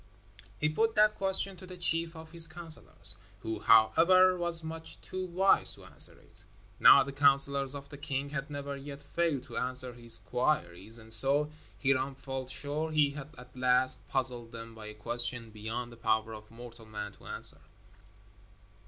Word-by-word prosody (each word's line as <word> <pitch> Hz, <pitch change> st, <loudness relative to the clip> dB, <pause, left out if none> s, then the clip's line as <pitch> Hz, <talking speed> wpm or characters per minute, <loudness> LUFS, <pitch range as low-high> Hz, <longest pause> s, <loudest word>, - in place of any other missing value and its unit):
He 155 Hz, -, 0 dB
put 225 Hz, +9 st, -1 dB
that 215 Hz, 0 st, +4 dB
question 195 Hz, -1 st, 0 dB
to 185 Hz, +1 st, -13 dB
the 185 Hz, 0 st, -9 dB
chief 165 Hz, -1 st, +1 dB
of 160 Hz, 0 st, -12 dB
his 165 Hz, -1 st, +3 dB
counselors, 160 Hz, -, +2 dB, 0.2 s
who, 110 Hz, +2 st, -5 dB
however, 185 Hz, +12 st, +4 dB
was 170 Hz, -2 st, -3 dB
much 160 Hz, 0 st, -9 dB
too 185 Hz, 0 st, -7 dB
wise 185 Hz, +3 st, +3 dB
to -, -, -16 dB
answer -, -, +3 dB
it. -, -, -21 dB, 0.4 s
Now -, -, +7 dB
the 140 Hz, -, -8 dB
counselors 140 Hz, 0 st, +3 dB
of 140 Hz, 0 st, -10 dB
the 145 Hz, -1 st, -12 dB
king 140 Hz, -1 st, -5 dB
had 150 Hz, 0 st, -5 dB
never 140 Hz, -1 st, -6 dB
yet 140 Hz, +1 st, -10 dB
failed 150 Hz, -3 st, -2 dB
to -, -, -10 dB
answer 125 Hz, 0 st, +1 dB
his 120 Hz, -1 st, +3 dB
queries, 105 Hz, -, -2 dB
and 110 Hz, -1 st, +4 dB
so 140 Hz, +6 st, +4 dB, 0.3 s
Hiram 135 Hz, 0 st, 0 dB
felt 135 Hz, -1 st, -7 dB
sure 150 Hz, +4 st, -2 dB
he 150 Hz, -2 st, +2 dB
had 145 Hz, 0 st, -10 dB
at 125 Hz, +1 st, -15 dB
last 130 Hz, 0 st, +1 dB
puzzled 125 Hz, -3 st, +1 dB
them 115 Hz, 0 st, -10 dB
by 110 Hz, -1 st, -11 dB
a 105 Hz, -, -10 dB
question 120 Hz, +1 st, -2 dB
beyond 110 Hz, +3 st, -7 dB
the 115 Hz, -, -14 dB
power 110 Hz, -1 st, -1 dB
of 105 Hz, 0 st, -12 dB
mortal 115 Hz, -1 st, -13 dB
man 105 Hz, -1 st, -7 dB
to -, -, -18 dB
answer. -, -, -4 dB
135 Hz, 175 wpm, -29 LUFS, 115-160 Hz, 0.4 s, Now